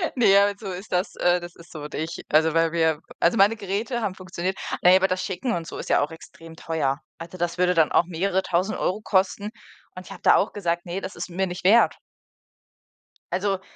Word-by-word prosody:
Ne, 200 Hz, -5 st, +5 dB
halt 200 Hz, 0 st, +1 dB
so 195 Hz, -3 st, -6 dB
ist 185 Hz, +3 st, -8 dB
das 180 Hz, +1 st, -1 dB
äh, 175 Hz, 0 st, +3 dB
das 175 Hz, -1 st, -10 dB
ist 170 Hz, 0 st, -16 dB
so. 155 Hz, -, -8 dB
Und 150 Hz, -, -7 dB
ich 160 Hz, +2 st, -4 dB
also, 160 Hz, +1 st, +3 dB
weil 165 Hz, 0 st, +2 dB
wir 160 Hz, -2 st, +1 dB, 0.2 s
also, 170 Hz, -, +3 dB
meine 200 Hz, +3 st, +5 dB
Geräte 210 Hz, +5 st, -3 dB
haben 195 Hz, -3 st, -2 dB
funktioniert. 185 Hz, 0 st, -4 dB, 0.2 s
Na 180 Hz, -, +6 dB
ja, 185 Hz, -, +8 dB
aber 190 Hz, 0 st, +2 dB
das 185 Hz, 0 st, -1 dB
Schicken 190 Hz, +6 st, -3 dB
und 170 Hz, -1 st, -4 dB
so -, -, -7 dB
ist -, -, -7 dB
ja -, -, +4 dB
auch 150 Hz, -, -2 dB
extrem 165 Hz, 0 st, -13 dB
teuer. 155 Hz, -4 st, -2 dB, 0.2 s
Also, 170 Hz, +2 st, -9 dB
das 175 Hz, 0 st, -2 dB
würde 180 Hz, 0 st, +3 dB
dann 160 Hz, -2 st, +3 dB
auch -, -, +4 dB
mehrere 185 Hz, +2 st, -1 dB
tausend 185 Hz, +5 st, -1 dB, 0.3 s
kosten 200 Hz, +1 st, +1 dB, 0.5 s
und 185 Hz, -, -9 dB
ich -, -, -12 dB
habe -, -, -10 dB
da -, -, +6 dB
auch 200 Hz, -, +1 dB
gesagt: 175 Hz, -4 st, -2 dB
„Ne, 180 Hz, +2 st, -4 dB
das 190 Hz, -, -7 dB
ist -, -, -6 dB
es 170 Hz, -, -12 dB
mir 190 Hz, +1 st, 0 dB
nicht 180 Hz, +1 st, -7 dB
wert.“ 230 Hz, +5 st, +5 dB, 1.4 s
Also. 190 Hz, +1 st, 0 dB
180 Hz, 230 wpm, -24 LUFS, 165-195 Hz, 1.4 s, ja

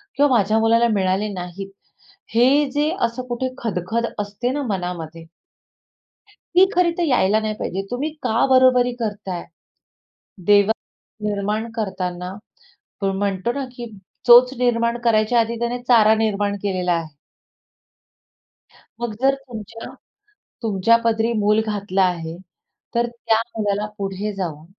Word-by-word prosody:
किंवा 285 Hz, +1 st, +4 dB
माझ्या 215 Hz, +1 st, +2 dB
मुलाला 230 Hz, +1 st, +4 dB
मिळाले 190 Hz, +1 st, +1 dB
नाहीत. 185 Hz, +2 st, -7 dB, 0.6 s
हे 265 Hz, +5 st, +4 dB
जे 295 Hz, +1 st, +1 dB, 0.2 s
असं 235 Hz, +2 st, -4 dB
कुठे 250 Hz, +1 st, -2 dB
खदखद 225 Hz, +1 st, -2 dB
असते 210 Hz, +5 st, -2 dB
ना, 290 Hz, +1 st, -2 dB
मनामध्ये, 175 Hz, -4 st, -4 dB, 1.1 s
ती 370 Hz, -2 st, +3 dB
खरी 355 Hz, -1 st, +3 dB
तर 350 Hz, -, +1 dB
यायला 220 Hz, -, +3 dB
नाही 215 Hz, -1 st, -2 dB
पाहिजे. 190 Hz, +2 st, -3 dB
तुम्ही 285 Hz, +6 st, -2 dB
का 225 Hz, +4 st, +2 dB
बरोबरी 255 Hz, -1 st, +5 dB
करताय? 200 Hz, -5 st, -4 dB, 1.0 s
देवानी 210 Hz, +1 st, 0 dB
निर्माण 210 Hz, +3 st, -2 dB
करतांना 185 Hz, -4 st, -3 dB, 0.8 s
म्हणतो 200 Hz, +3 st, -1 dB
ना, 275 Hz, 0 st, -3 dB
की 240 Hz, -1 st, -6 dB, 0.4 s
चोच 245 Hz, +2 st, +8 dB
निर्माण 235 Hz, -1 st, +1 dB
करायच्या 230 Hz, 0 st, +3 dB
आधी 230 Hz, +1 st, 0 dB
त्याने 240 Hz, +1 st, -2 dB
चारा 220 Hz, -3 st, +6 dB
निर्माण 205 Hz, -2 st, 0 dB
केलेला 180 Hz, -3 st, 0 dB
आहे. 165 Hz, -1 st, -2 dB, 1.9 s
मग 235 Hz, -3 st, -2 dB
जर 275 Hz, +1 st, +4 dB
तुमच्या 230 Hz, -4 st, -9 dB, 0.7 s
तुमच्या 220 Hz, +2 st, +3 dB
पदरी 230 Hz, 0 st, +1 dB
मूल 210 Hz, +1 st, +3 dB
घातला 205 Hz, -3 st, -1 dB
आहे, 170 Hz, -2 st, -2 dB, 0.6 s
तर 240 Hz, 0 st, +2 dB
त्या 230 Hz, -1 st, 0 dB, 0.2 s
मुलाला 205 Hz, 0 st, 0 dB
पुढे 200 Hz, +1 st, -3 dB
जाऊन 160 Hz, -5 st, -5 dB
220 Hz, 125 wpm, -21 LUFS, 195-240 Hz, 1.9 s, चोच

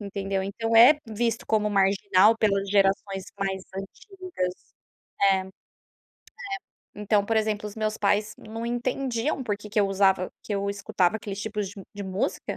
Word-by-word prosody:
entendeu. 195 Hz, -1 st, -3 dB
Então 225 Hz, +4 st, -2 dB
é 270 Hz, +6 st, +8 dB
visto 225 Hz, +1 st, -1 dB
como 210 Hz, -1 st, +2 dB
marginal 200 Hz, +1 st, +4 dB
pelas 200 Hz, -2 st, +1 dB
gerações 195 Hz, -1 st, +1 dB
mais 190 Hz, -1 st, -2 dB
antigas. 355 Hz, -, -5 dB, 0.8 s
É, -, -, +3 dB
é. 190 Hz, -, -5 dB, 1.5 s
Então, 210 Hz, 0 st, +1 dB
por 225 Hz, +1 st, 0 dB
exemplo, 215 Hz, -1 st, 0 dB
os 205 Hz, -, -12 dB
meus 215 Hz, 0 st, -1 dB
pais 210 Hz, +1 st, +1 dB
não 225 Hz, +2 st, -7 dB
entendiam 245 Hz, +2 st, -1 dB
porque 210 Hz, -1 st, -4 dB
que 215 Hz, -, -1 dB
eu 200 Hz, -, +3 dB
usava 190 Hz, -1 st, +2 dB
que 210 Hz, -, -5 dB
eu 200 Hz, 0 st, -1 dB
escutava 200 Hz, -1 st, 0 dB
aqueles 205 Hz, -2 st, -6 dB
tipos 210 Hz, -2 st, -3 dB
de 200 Hz, -, -11 dB, 0.2 s
de 205 Hz, -, -6 dB
música. 190 Hz, +1 st, -3 dB
205 Hz, 155 wpm, -26 LUFS, 195-220 Hz, 1.5 s, é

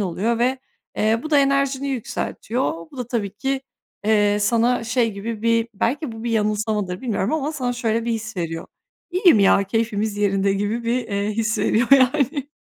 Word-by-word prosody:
oluyor 205 Hz, +5 st, -1 dB
ve, 255 Hz, +2 st, +1 dB, 0.4 s
eee, 220 Hz, +2 st, +2 dB
bu 310 Hz, -, -6 dB
da 290 Hz, -, +5 dB
enerjini 275 Hz, 0 st, +1 dB
yükseltiyor. 230 Hz, -6 st, -3 dB
Bu 275 Hz, -, -14 dB
da 245 Hz, -, -3 dB
tabii 220 Hz, -5 st, -2 dB
ki, 270 Hz, +3 st, -2 dB, 0.4 s
eee, 205 Hz, -1 st, +3 dB
sana 235 Hz, +3 st, +2 dB
şey 230 Hz, -1 st, +1 dB
gibi 215 Hz, +2 st, -5 dB
bir 230 Hz, 0 st, +2 dB
-belki 255 Hz, +5 st, -1 dB
bu 225 Hz, +1 st, -8 dB
bir 235 Hz, -, -1 dB
yanılsamadır 210 Hz, -3 st, -1 dB
bilmiyorum 220 Hz, -4 st, -1 dB
ama 310 Hz, 0 st, -1 dB
sana 250 Hz, -5 st, -2 dB
şöyle 230 Hz, -1 st, -1 dB
bir 235 Hz, -, -1 dB
his 220 Hz, -2 st, -5 dB
veriyor; 165 Hz, -1 st, -4 dB, 0.4 s
"İyiyim 360 Hz, -, +5 dB
ya, 195 Hz, 0 st, +5 dB
keyfimiz 215 Hz, 0 st, -1 dB
yerinde." 195 Hz, -1 st, +1 dB
gibi 205 Hz, +4 st, -2 dB
bir, 240 Hz, +2 st, +1 dB
eee, 200 Hz, +1 st, -1 dB
his 215 Hz, 0 st, -1 dB
veriyor 230 Hz, +2 st, +2 dB
yani. 275 Hz, +1 st, +3 dB
230 Hz, 175 wpm, -22 LUFS, 205-255 Hz, 0.4 s, da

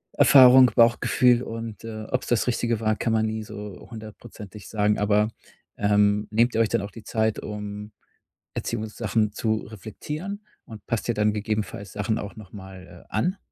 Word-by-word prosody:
Erfahrung, 130 Hz, -1 st, +8 dB
Bauchgefühl 120 Hz, +1 st, +4 dB
und, 115 Hz, -2 st, -7 dB
äh, 110 Hz, -1 st, -6 dB
ob's 130 Hz, -, -1 dB
das 120 Hz, -2 st, +1 dB
Richtige 120 Hz, -2 st, 0 dB
war, 110 Hz, -1 st, +1 dB
kann 115 Hz, -, -1 dB
man 110 Hz, 0 st, +2 dB
nie 110 Hz, 0 st, -3 dB
so 105 Hz, -2 st, -9 dB
hundertprozentig 110 Hz, -3 st, -11 dB
sagen. 105 Hz, -1 st, +1 dB
Aber, 105 Hz, +1 st, +2 dB, 0.5 s
ähm, 105 Hz, 0 st, +2 dB
nehmt 115 Hz, +3 st, +2 dB
ihr 115 Hz, -, +2 dB
euch 110 Hz, -, +2 dB
denn -, -, 0 dB
auch 100 Hz, -, -7 dB
die 115 Hz, -, -12 dB
Zeit, 110 Hz, -1 st, -1 dB
um 105 Hz, 0 st, -7 dB, 0.6 s
Erziehungssachen 110 Hz, -1 st, -2 dB
zu 110 Hz, 0 st, 0 dB
reflektieren 150 Hz, -, -7 dB, 0.2 s
und 110 Hz, -3 st, -12 dB
passt 115 Hz, -3 st, -2 dB
ihr 120 Hz, -, +1 dB
dann 105 Hz, 0 st, +2 dB
gegebenenfalls 105 Hz, -2 st, -4 dB
Sachen 105 Hz, +2 st, -1 dB
auch 100 Hz, -, -7 dB
noch 105 Hz, -4 st, -13 dB
mal, 95 Hz, -3 st, -12 dB
äh, -, -, -20 dB
an? 180 Hz, -, 0 dB
110 Hz, 170 wpm, -24 LUFS, 105-115 Hz, 0.6 s, Erfahrung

